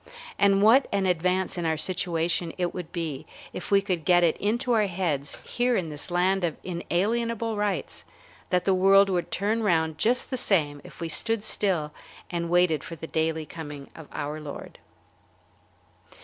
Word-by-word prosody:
And 200 0 +4
what 245 +5 +6
an 200 -1 +1
advance 180 +1 0
in 170 - -2
our 160 -1 0
situation 170 -1 -1
it 180 -1 -1
would 180 -3 -6
be 160 -6 -4 0.3
if - - -6
we 200 -1 +4
could 180 -5 -1
get 175 +2 +4
it 165 - +3
into 240 +5 0
our 215 -3 +3
heads 170 -7 -2
here 245 0 0
in 170 -4 -2
this 150 +2 -4
land 180 +2 +1
of 165 -3 -1
inalienable 225 +6 -1
rights 205 -1 -2 0.5
that 180 -1 +1
the 195 - +4
world 195 +1 +5
would 175 -2 -1
turn 215 +4 0
round 160 -6 +1
just 245 +4 +1
the 255 - -1
same 150 - +1
if - - -13
we 165 - -2
stood 225 +6 0
still 170 -9 0 0.4
and 170 -1 -2
waited 175 -3 +3
for 165 - -7
the 160 - -8
daily 160 0 -1
coming 145 -4 -9
of 160 -3 -11
our 150 +1 -4
Lord! 150 -2 -9
180 Hz, 175 wpm, -26 LUFS, 160-200 Hz, 0.5 s, what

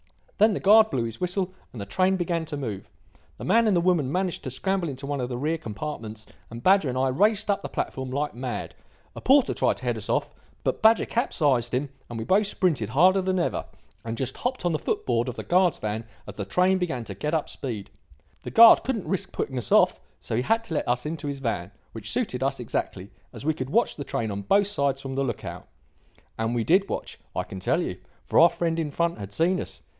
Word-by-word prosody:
Then 215 0 +5
the - - -2
guard 215 +2 +6
blew 125 - -1
his 115 -1 -6
whistle 185 +1 0 0.2
and 120 - -9
the 100 - -4
train 185 - +2
began 170 -2 -1
to 150 -2 -5
move. 110 -8 -5 0.5
The - - -9
man 230 0 +3
and 200 -4 +3
the - - +3
woman 170 -7 +2
managed 185 +1 -1
to - - -4
scramble 185 +6 -1
into 135 0 -6
one 140 -1 -2
of 125 - -3
the 120 - -3
rear 155 +5 -1
compartments 110 -3 -6 0.2
and 115 +1 -9
Badger 190 -6 +4
and 125 - -3
I 130 +1 +2
raced 205 +9 +2
up 200 - -1
the - - -6
platform 130 -1 -3
like 145 +3 -2
mad. 125 0 -5 0.4
A - - -7
porter 270 0 +4
tried - - +1
to - - -9
head - - -1
us - - -6
off, - - 0 0.3
but - - -1
Badger 220 +1 +5
capsized 140 - +1
him 140 +2 -1 0.2
and 120 - -6
we 110 - -4
both 200 - +3
sprinted 155 - 0
harder 185 - +4
than 185 0 0
ever, 175 - -1 0.4
and 115 0 -4
just 130 +1 -3
hopped 250 -6 -3
on 175 - +2
the 155 - -1
foot - - -2
board 120 0 +1
of 120 - -6
the - - -6
guard's 180 -1 +3
van 110 +1 -3 0.2
as 105 - -8
the 100 -1 -5
train 185 - +2
began 160 -10 -2
to 105 - -7
get 150 - -2
up 155 - -1
speed. 110 -7 -5 0.5
The - - -6
guard 230 0 +8
couldn't 235 -7 -2
risk 190 - -2
putting 130 -2 -3
us 120 - -6
off, - - +5 0.2
so - - -4
he 120 - +2
had 225 - +1
to 175 - -6
let - - -1
us 125 +2 0
into 150 -1 -4
his 140 -1 -3
van, 115 -9 -3 0.2
which 110 -2 -5
suited 200 - -1
us 135 0 0
exactly, 100 -4 -4 0.2
as - - -10
we 160 - +2
could 130 -3 -5
watch 235 +11 +2
the 145 - -5
train 110 -5 -2
on 100 0 -4
both 200 - +3
sides 140 -9 0
from 135 -1 -5
the 135 +1 0
look 120 -6 -4
out. - - -7 0.7
And 115 +2 0
we 115 - +1
did 190 - +3
watch, - - -5 0.2
I - - 0
can 95 - -8
tell - - +1
you; - - -5 0.3
for - - +3
our 170 +2 +8
friend 170 0 -1
in 155 -2 -1
front 170 -1 -1
had 100 -1 -7
seen 175 - +1
us. - - -8
145 Hz, 245 wpm, -26 LUFS, 120-185 Hz, 0.7 s, guard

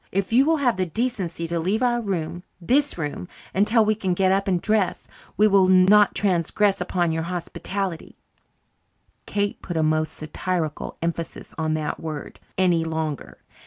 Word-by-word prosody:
If 195 +3 -1
you 260 +4 +6
will 320 +1 +3
have 245 -8 +1
the 185 - +1
decency 190 -5 -2
to 170 0 -1
leave 200 +8 0
our 240 -1 +2
room 175 -5 -3 0.2
this 275 - +1
room 150 +2 -4 0.3
until 215 +3 +4
we 215 - +3
can 190 -4 -1
get 190 0 +3
up 195 +1 +1
and 180 -2 +2
dress 210 -1 0 0.3
we 210 - +5
will 195 -2 +4
not 190 +3 +5
transgress 195 +1 +1
upon 175 -2 0
your 160 0 -1
hospitality" 180 0 -4 1.1
(Kate 205 0 -2
put 175 -3 -4
a 160 - +2
most 155 0 +1
satirical 155 0 -4
emphasis 170 -1 -4
on 155 0 0
that 155 -1 -3
word) 155 -3 -6 0.2
"any 175 -3 +3
longer. 160 -3 -4
185 Hz, 165 wpm, -23 LUFS, 165-210 Hz, 1.1 s, you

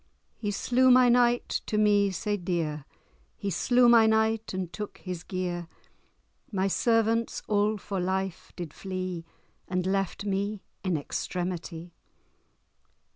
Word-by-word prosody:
He 210 - -3
slew 250 +5 +3
my 250 0 +7
knight 240 0 +3 0.2
to 210 - -1
me 205 -1 +4
sae 205 +2 -2
dear; 165 -6 -2 0.5
He 200 - -3
slew 245 +7 +4
my 230 -2 +7
knight, 220 0 +1
and 185 -2 -4
took 210 -1 -6
his 180 -3 -6
gear; 180 -2 -3 0.8
My 195 -2 +1
servants 225 +2 +1
all 210 +1 +2
for 195 -1 -4
life 190 0 -2
did 175 -5 -6
flee, 185 -3 -5 0.4
And 180 -1 -1
left 195 +1 -1
me 200 +1 -2 0.2
in 185 -3 0
extremitie. 175 +2 -4
195 Hz, 130 wpm, -28 LUFS, 180-220 Hz, 0.8 s, my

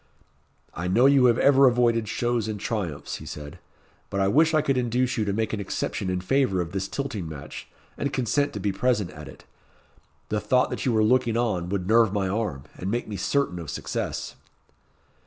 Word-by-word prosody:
"I 90 +2 -4
know 115 +8 +4
you 135 -2 +6
have 120 -1 +4
ever 135 -1 +6
avoided 120 -2 +2
shows 120 0 -1
and 105 -2 -4
triumphs," 95 - -3
he - - -11
said; 75 -1 -8 0.5
"but 100 - -2
I 95 0 +2
wish 160 +7 +4
I 155 - +3
could 135 - +1
induce 125 +1 0
you 110 - 0
to 100 - 0
make 110 +2 -1
an 110 - -2
exception 95 -1 -3
in 90 0 -1
favour 105 -2 +1
of 85 -1 -3
this 95 0 -2
tilting 105 - -4
match, 75 -3 -8 0.3
and 140 - -1
consent 135 +3 0
to 105 - -4
be 100 +1 0
present 105 -2 0
at 75 -1 -10
it. 70 +2 -13 0.9
The 105 - 0
thought 125 +3 +2
that - - -3
you - - +3
were 110 -1 +3
looking 120 0 +2
on 95 -8 -1
would 95 -2 -2
nerve 110 -1 +4
my 100 -2 0
arm, 95 -9 -2
and 95 - -4
make 120 +3 -2
me 105 - -5
certain 100 0 0
of 80 -3 -7
success." - - -4
110 Hz, 205 wpm, -25 LUFS, 95-125 Hz, 0.9 s, you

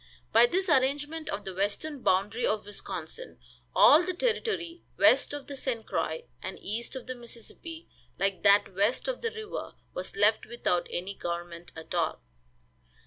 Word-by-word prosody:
By 230 +2 +8
this 375 +8 0
arrangement 295 +2 +1
of 200 +1 -3
the 190 - -4
western 205 +10 -2
boundary 205 +5 +2
of 215 -2 +1
Wisconsin 205 - -7 0.4
all 310 - +8
the 365 0 -2
territory 410 -6 -1 0.2
west - - +5
of 290 -1 -5
the 280 - -7
St. 245 -4 -2
Croix 485 - -1 0.2
and - - -5
east 230 +6 -4
of 260 - -6
the 255 - -4
Mississippi, 250 +7 -9 0.3
like 195 -1 0
that 200 -1 +5
west 205 +6 +1
of - - -2
the 460 - 0
river, 440 -1 -6 0.2
was 180 - -4
left 210 +2 +3
without 215 -6 0
any 185 +3 -3
government 170 -1 -5
at 160 0 -8
all. - - 0
240 Hz, 160 wpm, -29 LUFS, 200-325 Hz, 0.4 s, By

